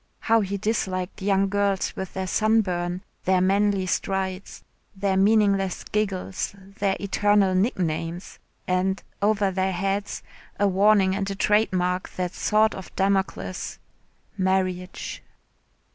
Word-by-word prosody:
How 225 0 +3
he 200 0 -2
disliked 190 -3 -2
young 195 0 +2
girls 200 -1 0
with 190 -1 -6
their 190 0 -2
sunburn, 185 -4 +1 0.2
their 185 0 +3
manly 195 +1 +2
strides, 190 +1 -3 0.3
their 195 0 0
meaningless 200 -2 +3
giggles, 195 -2 -2 0.2
their 195 -1 +1
eternal 205 -1 +2
nicknames! 175 -4 -1 0.3
And, 185 +1 0 0.2
over 205 -1 +2
their 190 0 0
heads, 195 +2 -2 0.4
a 205 - +4
warning 195 0 +4
and 195 0 -2
a 195 - -3
trade 210 +2 +2
mark, 180 0 -1
that 180 -1 -2
sword 215 0 +2
of 190 - -8
Damocles 195 -1 -1 0.6
marriage. 185 -1 -1
195 Hz, 120 wpm, -25 LUFS, 185-205 Hz, 0.6 s, a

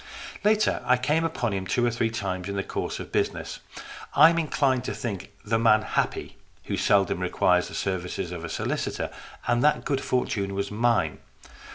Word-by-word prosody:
Later, 210 -5 +3
I 125 0 +4
came 150 +6 +1
upon 125 -9 -1
him 95 -1 -3
two 120 +6 +1
or 120 - +2
three 115 -1 0
times 95 -4 -3
in 100 - -3
the 95 - -1
course - - -4
of - - -8
business. - - -1 0.6
I 155 +3 +8
am 170 - +1
inclined 135 -5 +1
to - - -3
think 105 -6 -5
the 115 +1 +1
man 110 -2 +5
happy - - -2 0.3
who - - -3
seldom 100 -3 +2
requires 90 0 +2
the - - -8
services 90 -1 -2
of 85 -2 -6
a 85 - -5
solicitor, - - -2 0.4
and 120 0 +2
that 150 - +3
good 140 -2 0
fortune 100 -6 -1
was 100 +1 -2
mine. 115 +2 +1
115 Hz, 185 wpm, -26 LUFS, 95-125 Hz, 0.6 s, I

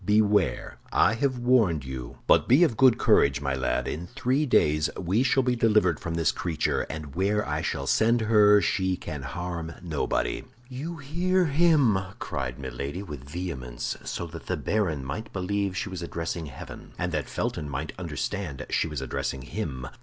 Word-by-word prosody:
Beware! 105 - +2
I - - +4
have 130 +2 0
warned 115 - +3
you! 65 -2 -7
But - - +4
be 135 +8 +6
of 155 -10 +2
good 130 0 +5
courage, 70 0 +4
my 70 -1 -1
lad; 60 -1 -1
in 85 +4 -4
three 135 - 0
days 75 - +3
we 95 +6 +1
shall 130 +1 +3
be 125 0 +1
delivered 105 -8 +3
from 85 -1 -4
this 80 -2 +2
creature, 85 -4 -1
and 75 -3 -6
where 100 +3 +1
I - - -1
shall 70 - -2
send 115 - +3
her 105 -2 +6
she 95 0 +1
can 75 -3 -6
harm 85 +3 -5
nobody." 80 -4 -1 0.2
"You 145 +7 -6
hear 175 +6 +1
him!" 145 - +4 0.2
cried 65 -2 -4
Milady, 70 +7 -5
with 75 -7 -9
vehemence, 65 -8 -4
so 85 - -4
that 80 -1 -10
the - - -1
baron 85 -11 -1
might 110 +11 -5
believe 100 0 -1
she 105 - -2
was 95 -2 -6
addressing 85 -1 -4
heaven, 70 - -10
and - - -2
that - - -2
Felton 75 -2 -3
might 70 - -4
understand 85 -10 -4
she - - +1
was - - -4
addressing 70 -1 -3
him. 70 -6 -4
90 Hz, 175 wpm, -27 LUFS, 75-115 Hz, 0.2 s, be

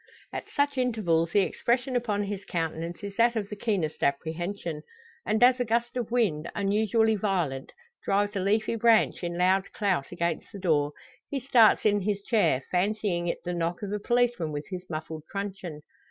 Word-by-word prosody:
At - - -5
such 285 -1 0
intervals 180 -10 +1
the 205 - +5
expression 245 +6 0
upon 215 -4 0
his 200 -1 -4
countenance 165 +1 -4
is 200 -1 -6
that 235 +1 +4
of 205 -3 -2
the 210 - -5
keenest 195 -8 -2
apprehension; 160 +3 -2 0.5
and 220 +2 +2
as 250 +1 +6
a - - +2
gust 235 +1 -1
of 245 -3 -2
wind, 205 -11 0
unusually 220 +2 +2
violent, 175 -10 -1 0.3
drives 205 +1 +1
a - - 0
leafy 215 +4 +1
branch 230 -3 +3
in 170 0 -3
loud 185 +2 +2
clout 185 -10 0
against 170 -2 -2
the - - -8
door, 150 -6 +1 0.4
he 280 - -2
starts 240 -5 +5
in 205 -1 +3
his 200 0 -1
chair, 205 - +2
fancying 185 -2 0
it 170 - -3
the 180 - -3
knock 170 +2 -2
of 200 - -4
a 210 - -1
policeman 240 -7 +1
with 145 0 -4
his 180 0 -6
muffled 155 0 -5
truncheon! 195 -6 -5
200 Hz, 180 wpm, -27 LUFS, 170-220 Hz, 0.5 s, as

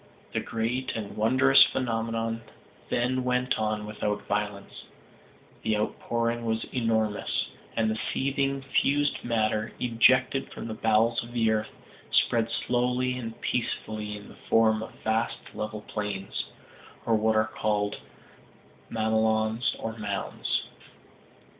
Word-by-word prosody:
The - - +1
great 115 +3 -2
and 105 -3 -5
wondrous 130 +5 +7
phenomenon 115 -2 -1 0.5
then 125 +2 +1
went 125 -1 +1
on 110 -1 -1
without 105 0 -3
violence 105 -1 -3 0.8
the 110 -1 +1
outpouring 115 +2 -1
was 110 -1 0
enormous, 110 -4 0 0.3
and 115 -1 +3
the 110 - -2
seething 135 0 0
fused 140 +1 +1
matter, 110 -2 0
ejected 125 +3 +3
from - - -6
the 110 - -4
bowels 110 +1 +3
of 120 +1 -11
the 115 -2 +3
earth, 110 0 0 0.4
spread 115 -1 +3
slowly 125 +2 0
and 115 -3 -6
peacefully 105 -3 -2
in 105 - -11
the - - -14
form 110 -1 +4
of 110 - -5
vast 110 +1 +1 0.2
level 105 0 -4
plains, 105 -2 -3 0.6
or 115 - +2
what 110 0 +3
are 110 0 +4
called 105 -1 0 0.9
mamelons 110 +1 +1
or 110 0 -4
mounds. 100 -2 -1
115 Hz, 120 wpm, -28 LUFS, 110-120 Hz, 0.9 s, wondrous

